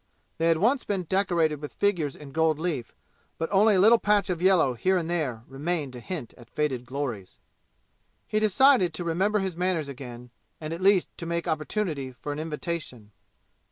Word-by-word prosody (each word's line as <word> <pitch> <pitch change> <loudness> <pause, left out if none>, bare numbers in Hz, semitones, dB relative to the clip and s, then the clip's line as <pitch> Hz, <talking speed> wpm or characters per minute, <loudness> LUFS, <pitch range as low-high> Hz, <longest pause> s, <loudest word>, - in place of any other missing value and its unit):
They 165 - +2
had 165 -1 +4
once 240 - +2
been 195 -3 -2
decorated 170 -5 +1
with 150 - -7
figures 175 -9 0
in 145 -2 -11
gold 160 0 +2
leaf, 155 -7 -3 0.4
but 165 - -2
only 205 +1 +5
a - - +3
little 225 +4 +6
patch 205 -3 +2
of 175 -2 -3
yellow 180 -8 +4
here 185 +11 +1
and 165 -2 -2
there 145 -10 -2
remained 145 0 -3
to 125 - -8
hint 145 -2 -6
at 120 -1 -15
faded 130 -5 -2
glories. 125 -8 -5 0.9
He 215 - 0
decided 215 - +4
to 175 - -3
remember 190 +6 +1
his 190 -3 -3
manners 175 -4 -1
again, 125 -2 -9 0.3
and 155 0 -5
at 170 - -6
least 195 -1 +3
to 170 - -5
make 170 0 -2
opportunity 155 -4 -2
for 145 +4 -6
an 145 - -4
invitation. 155 - -5
165 Hz, 185 wpm, -26 LUFS, 140-185 Hz, 0.9 s, little